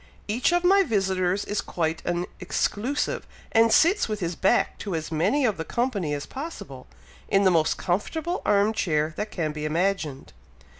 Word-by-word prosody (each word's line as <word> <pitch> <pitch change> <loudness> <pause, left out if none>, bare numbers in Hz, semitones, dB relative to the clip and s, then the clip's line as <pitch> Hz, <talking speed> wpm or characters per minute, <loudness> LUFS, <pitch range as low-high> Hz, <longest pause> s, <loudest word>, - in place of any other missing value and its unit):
Each 235 +9 +1
of 350 0 +2
my 390 +2 +6
visitors 190 - 0
is 205 0 -2
quite 160 -1 -2
an 175 0 0
exclusive, 255 +8 -1 0.2
and 225 0 +4
sits 345 - +4
with 215 -1 -2
his 170 -2 -2
back 195 +8 +1
to 195 -5 -3
as 160 0 -4
many 215 - +2
of 215 -4 +1
the 160 - -3
company 200 - -1
as 145 - -5
possible, 265 - -8 0.4
in 195 0 +3
the 190 - +5
most 160 -3 +2
comfortable 320 - -2
arm 205 +2 +3
chair 160 -8 0
that 210 +1 -3
can 160 -4 -2
be 150 0 -6
imagined. 160 - -1
195 Hz, 170 wpm, -25 LUFS, 165-230 Hz, 0.4 s, my